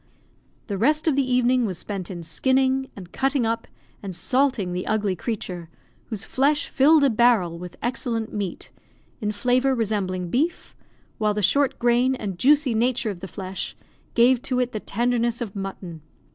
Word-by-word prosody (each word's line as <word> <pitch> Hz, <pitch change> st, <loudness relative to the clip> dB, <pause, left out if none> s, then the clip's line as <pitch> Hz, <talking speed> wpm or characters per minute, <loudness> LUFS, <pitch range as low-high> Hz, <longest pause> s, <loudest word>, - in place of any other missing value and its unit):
The 200 Hz, -3 st, -4 dB
rest 305 Hz, +8 st, +2 dB
of 305 Hz, -, +3 dB
the 270 Hz, -2 st, +1 dB
evening 250 Hz, -1 st, +3 dB
was 185 Hz, -4 st, -4 dB
spent 190 Hz, -1 st, -5 dB
in 175 Hz, -3 st, -6 dB
skinning, 265 Hz, +8 st, +1 dB
and 180 Hz, -3 st, -10 dB
cutting 270 Hz, -2 st, +1 dB
up, 230 Hz, +1 st, -2 dB, 0.3 s
and 195 Hz, -3 st, -6 dB
salting 255 Hz, -5 st, +1 dB
the 180 Hz, +1 st, -3 dB
ugly 210 Hz, -3 st, 0 dB
creature, 180 Hz, -5 st, -5 dB, 0.4 s
whose 220 Hz, -4 st, -4 dB
flesh 290 Hz, +3 st, +1 dB
filled 295 Hz, +3 st, +5 dB
a 280 Hz, -, +5 dB
barrel 215 Hz, -8 st, +3 dB
with 180 Hz, 0 st, -9 dB
excellent 235 Hz, -2 st, -2 dB
meat, 200 Hz, -4 st, -4 dB, 0.5 s
in 210 Hz, -1 st, -1 dB
flavour 250 Hz, +5 st, +2 dB
resembling 190 Hz, -6 st, -2 dB
beef, 315 Hz, +7 st, -1 dB, 0.4 s
while 210 Hz, -1 st, +1 dB
the 210 Hz, -, -1 dB
short 280 Hz, +6 st, +3 dB
grain 245 Hz, +2 st, +3 dB
and 195 Hz, -7 st, -5 dB
juicy 285 Hz, -2 st, +4 dB
nature 230 Hz, -1 st, +1 dB
of 185 Hz, -, -8 dB
the 190 Hz, -, -7 dB
flesh 190 Hz, -1 st, -5 dB, 0.4 s
gave 240 Hz, +1 st, +5 dB
to 255 Hz, -2 st, -1 dB
it 250 Hz, -1 st, 0 dB
the 215 Hz, -, -3 dB
tenderness 235 Hz, +2 st, 0 dB
of 225 Hz, -5 st, -5 dB
mutton. 190 Hz, -4 st, -6 dB
230 Hz, 170 wpm, -24 LUFS, 195-260 Hz, 0.5 s, filled